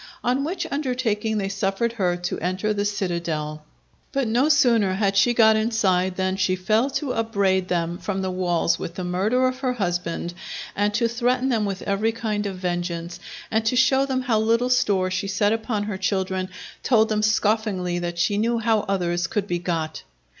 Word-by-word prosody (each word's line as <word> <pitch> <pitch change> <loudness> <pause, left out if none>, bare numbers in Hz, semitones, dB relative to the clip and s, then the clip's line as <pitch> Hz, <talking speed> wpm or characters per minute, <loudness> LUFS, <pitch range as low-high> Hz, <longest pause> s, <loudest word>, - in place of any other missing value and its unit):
On 255 +3 +1
which 340 +6 -2
undertaking 245 -6 -1
they 195 -2 -1
suffered 195 +4 -1
her 180 -6 0
to 175 0 -3
enter 185 +5 -1
the 205 0 -1
citadel. 170 -7 -2 0.5
But 270 -3 0
no 245 +7 +2
sooner 235 -10 +4
had 195 0 +1
she 210 +5 +5
got 220 -1 +6
inside 195 -5 +1
than 190 0 -1
she 190 -1 +1
fell 215 +8 +1
to 275 -5 -3
upbraid 200 -5 +1
them 170 -1 -1
from 195 -2 -3
the 190 - -1
walls 175 -2 +1
with 170 - -6
the 185 - -4
murder 205 +9 +1
of 255 0 -3
her 255 -2 0
husband, 175 -5 -2 0.4
and 205 +1 +1
to 235 +2 +2
threaten 250 +3 0
them 225 -4 +1
with 195 -2 -4
every 210 +3 0
kind 210 -3 -2
of 190 -2 -5
vengeance; 175 -1 -3 0.3
and 220 0 +2
to 250 - +2
show 265 +2 +4
them 260 -1 -1
how 230 -4 +2
little 230 +3 +2
store 190 -6 +2
she 185 +2 -2
set 205 +2 +2
upon 220 -2 -2
her 205 -2 -4
children, 190 -1 -1 0.3
told 225 -3 +3
them 215 -1 +1
scoffingly 210 -4 +1
that 175 0 -4
she 200 +4 +1
knew 235 +2 +1
how 225 -1 +2
others 175 -3 0
could 205 0 -1
be 175 -2 -1
got. 165 -3 -3
205 Hz, 190 wpm, -23 LUFS, 185-230 Hz, 0.5 s, got